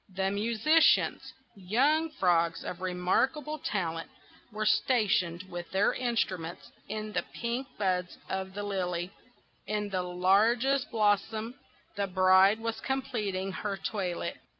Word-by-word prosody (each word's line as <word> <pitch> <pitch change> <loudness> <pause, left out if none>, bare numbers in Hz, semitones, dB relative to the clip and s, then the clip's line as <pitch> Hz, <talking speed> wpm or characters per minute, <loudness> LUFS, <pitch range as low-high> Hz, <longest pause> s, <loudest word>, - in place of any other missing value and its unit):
The 190 0 0
musicians, 230 +10 +3 0.2
young 270 - +2
frogs 170 - +1
of 180 - -6
remarkable 260 - 0
talent, 165 -5 -3 0.4
were 215 0 -3
stationed 195 -8 +2
with 175 -2 -7
their 195 +2 +2
instruments 190 -9 -2 0.2
in 215 0 -4
the - - +1
pink 240 +3 -3
buds 180 -3 -1
of 190 0 -4
the 205 - -3
lily; 180 -3 -2 0.6
in 210 -1 -2
the 185 -2 -1
largest 220 +10 +2
blossom 215 +1 +1 0.4
the 200 -1 0
bride 190 +2 +5
was 230 0 -3
completing 220 -8 -2
her 200 +1 -3
toilet. 190 -4 -3
200 Hz, 120 wpm, -29 LUFS, 185-230 Hz, 0.6 s, bride